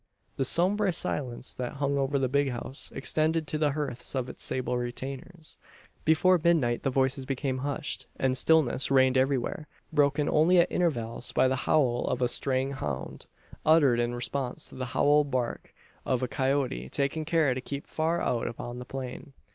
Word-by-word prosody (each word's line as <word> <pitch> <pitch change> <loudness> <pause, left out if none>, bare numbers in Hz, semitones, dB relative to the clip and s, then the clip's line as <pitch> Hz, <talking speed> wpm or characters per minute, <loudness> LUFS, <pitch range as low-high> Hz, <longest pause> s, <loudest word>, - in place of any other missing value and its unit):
The 135 - +1
sombre 190 +7 +3
silence 130 -6 -3
that 125 -1 -4
hung 140 0 -1
over 135 +1 +1
the 135 -1 +1
"big 140 +2 +1
house" 130 +2 -6
extended 155 +3 +1
to 155 0 -2
the 150 -2 +2
hearths 140 -3 -4
of 130 -1 -2
its - - -8
sable 130 -1 -1
retainers. 135 +7 -6 0.5
Before 170 +3 +4
midnight 150 -9 +2
the 135 - 0
voices 130 0 +1
became 135 -1 -2
hushed, 145 +2 -3
and 130 -1 +1
stillness 140 -2 +3
reigned 130 -1 +4
everywhere; 135 +3 0 0.3
broken 145 0 +2
only 165 +4 +4
at 170 - +4
intervals 120 -9 -1
by - - +4
the 130 - +1
howl 125 -6 +3
of - - -1
a - - +3
straying 130 +2 0
hound 75 - -5 0.4
uttered 145 -6 +5
in 120 0 0
response 125 +1 -3
to - - -13
the 130 -1 -4
howl 145 +1 +5
bark 130 -4 -3 0.3
of 130 -1 0
a - - +1
coyote 130 - -1
taking 140 - -1
care 155 -4 +2
to 130 - -4
keep 140 +2 -6
far 165 +2 -1
out 120 - 0
upon 120 +1 -6
the 125 - -7
plain. 135 +2 -7
135 Hz, 175 wpm, -28 LUFS, 125-150 Hz, 0.5 s, uttered